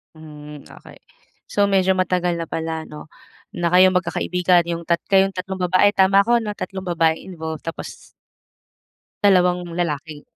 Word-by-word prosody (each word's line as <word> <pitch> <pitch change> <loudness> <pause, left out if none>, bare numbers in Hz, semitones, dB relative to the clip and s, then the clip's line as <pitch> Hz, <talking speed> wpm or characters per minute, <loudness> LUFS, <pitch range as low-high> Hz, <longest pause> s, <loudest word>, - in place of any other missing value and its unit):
Hm, 150 -2 -12
okey. - - -15 0.5
So 205 - +1
medyo 190 -1 +2
matagal 180 -1 0
na 165 - -5
pala 160 0 -4
ano, 150 +1 -11 0.5
na 170 -1 -1
kayong 185 +1 +5
magkakaibigan, 180 -1 +1
yung 170 0 -4
tat 170 0 +1
kayong 195 0 +3
tatlong 190 +1 -5
babae 185 +3 +4
tama 195 +1 +4
ko 235 +2 +2
'no? 215 -2 -4
Tatlong 190 0 -6
babaeng 165 -2 0
involved 160 -2 -6
tapos 165 - -7 1.3
dalawang 180 -3 +3
lalaki. 155 -3 -4
180 Hz, 145 wpm, -21 LUFS, 165-190 Hz, 1.3 s, kayong